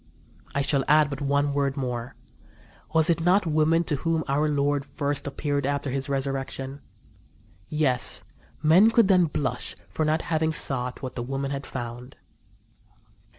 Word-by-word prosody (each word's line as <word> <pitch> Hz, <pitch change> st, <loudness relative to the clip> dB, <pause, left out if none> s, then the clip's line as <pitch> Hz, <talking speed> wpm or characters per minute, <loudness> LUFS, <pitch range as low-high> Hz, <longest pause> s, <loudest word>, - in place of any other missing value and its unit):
I 140 Hz, -, +1 dB
shall 140 Hz, -1 st, +1 dB
add 150 Hz, -1 st, +4 dB
but 140 Hz, +1 st, -5 dB
one 140 Hz, 0 st, +1 dB
word 140 Hz, 0 st, 0 dB
more. 125 Hz, -2 st, -4 dB, 0.8 s
Was 160 Hz, +1 st, +3 dB
not 180 Hz, +4 st, +3 dB
it -, -, -1 dB
women 155 Hz, +2 st, +3 dB
to 150 Hz, -3 st, -2 dB
whom 165 Hz, +2 st, 0 dB
our 150 Hz, +3 st, +1 dB
Lord 145 Hz, -1 st, +1 dB
first 140 Hz, 0 st, -3 dB
appeared 145 Hz, 0 st, -2 dB
after 140 Hz, -1 st, -1 dB
His 135 Hz, +1 st, -3 dB
resurrection? 135 Hz, 0 st, -3 dB, 0.9 s
Yes, 140 Hz, -5 st, +1 dB, 0.4 s
men 175 Hz, +8 st, +6 dB
could 230 Hz, -2 st, +4 dB
then 180 Hz, -2 st, +5 dB
blush 135 Hz, -5 st, -2 dB
for 155 Hz, -, -2 dB
not 155 Hz, +1 st, +1 dB
having 160 Hz, 0 st, 0 dB
sought 125 Hz, -3 st, -1 dB
what 130 Hz, 0 st, -4 dB
the 120 Hz, -, -4 dB
women 135 Hz, +2 st, -3 dB
had 140 Hz, 0 st, -4 dB
found." 120 Hz, +1 st, -7 dB
140 Hz, 150 wpm, -26 LUFS, 135-155 Hz, 0.9 s, men